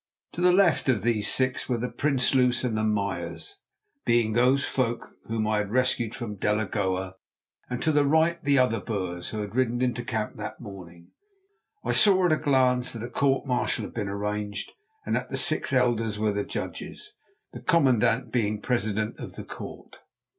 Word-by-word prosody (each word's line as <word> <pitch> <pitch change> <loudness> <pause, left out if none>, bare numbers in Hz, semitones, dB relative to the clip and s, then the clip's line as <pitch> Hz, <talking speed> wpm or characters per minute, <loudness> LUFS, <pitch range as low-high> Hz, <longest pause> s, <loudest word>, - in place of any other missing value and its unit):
To 175 - -5
the 180 0 +6
left 180 -6 +3
of 110 -6 +2
these 110 -3 +3
six 130 0 +1
were 125 - +1
the 120 +2 -2
Prinsloos 130 -3 +2
and 125 -3 0 0.2
Meyers, 105 - -4 0.4
being 115 -2 +2
those 130 +4 +3
folk 120 -3 -2
whom 110 -1 -1
I 105 0 +1
had 105 -1 -2
rescued 120 -1 +1
from 110 -5 -6
Delagoa, 95 -2 -1 0.5
and 125 0 -3
to 160 - +3
the 145 -1 +3
right 160 +4 +2
the 140 -1 +3
other 125 -4 +3
Boers 90 -4 -4
who 110 - -4
had 105 -1 -6
ridden 120 -2 +1
into 125 -1 0
the - - -13
camp 110 -1 -3
that 105 - -6
morning. 90 -6 -11 0.7
I - - 0
saw 190 -3 +5
at 175 - +3
a 155 - +4
glance 130 -4 +2
that 115 -2 -6
a 120 - -6
court 135 +1 +1
martial 125 -2 0
had - - -10
been 105 -4 -3
arranged 105 0 -3 0.3
and - - 0
that - - -2
the - - -2
six - - 0
elders 120 -4 +1
were 105 0 +1
the 100 0 -1
judges, 420 0 -6 0.4
the - - -8
commandant 130 -7 +2
being 110 -4 +1
the 105 - -9
president 110 -3 -1
of - - -7
the - - -8
court. - - -9
120 Hz, 185 wpm, -26 LUFS, 105-130 Hz, 0.7 s, the